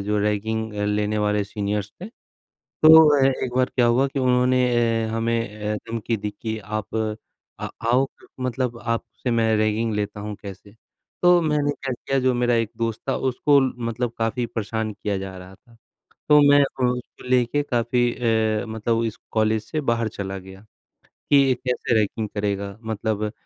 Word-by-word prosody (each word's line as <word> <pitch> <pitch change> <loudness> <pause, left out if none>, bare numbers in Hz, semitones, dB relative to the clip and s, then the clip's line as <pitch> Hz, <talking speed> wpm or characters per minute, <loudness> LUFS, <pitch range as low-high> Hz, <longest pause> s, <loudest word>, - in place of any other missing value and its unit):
जो 105 0 +1
रैगिंग 110 +1 -1
अ, 105 0 -2
लेने 105 +1 0
वाले 105 0 +1
सीनियर्स 100 0 -3
थे। 185 - -6 0.8
तो 160 0 +9
अ, 135 - +3 0.2
एक 125 - -4
बार 130 0 +2
क्या 120 -2 +4
हुआ 125 +4 +3
कि 135 0 -4
उन्होंने 125 0 +3
ए, 115 -1 +2
हमें 115 +1 0 0.2
ए, 105 0 -4
धमकी 115 0 -2
दी 105 0 -4
कि 110 -1 -3
आप 110 +1 -3 0.4
आ - - -4 0.2
आओ 130 +3 +4 0.3
मतलब 125 -1 -2
आपसे 115 +1 -3
मैं 115 -1 +2
रैगिंग 110 +1 0
लेता 105 0 -3
हूँ 105 0 -5
कैसे। 100 +1 -10 0.5
तो 175 - +5
मैंने 150 -2 +1
क्या 135 -2 -5
किया 135 +2 -2
जो 130 0 +2
मेरा 120 0 +1
एक 115 -2 0
दोस्त 115 -1 -2
था - - +1
उसको 140 +3 +3 0.3
मतलब 115 +1 -2
काफ़ी 115 +2 -1
परेशान 110 -1 -3
किया 100 0 -3
जा 95 0 -6
रहा 90 +1 -12
था। 115 +4 -24 0.5
तो 150 -1 +7
मैं 145 0 +6
अ, 135 -1 -2
उसको 125 0 -3
लेके 125 +3 +2
काफ़ी 120 -2 +1
अ, 110 -2 +1
मतलब 110 +1 -1
इस 115 - -3 0.2
कॉलेज 110 0 +1
से 155 +7 -3
बाहर 115 -1 0
चला 95 -1 -4
गया 95 +1 -12 0.7
कि 145 - +6
ये 135 -2 +5
कैसे 125 -1 -1
रैगिंग 110 0 0
करेगा। 100 -1 -2
मतलब 110 -1 -2
115 Hz, 175 wpm, -23 LUFS, 105-125 Hz, 0.8 s, तो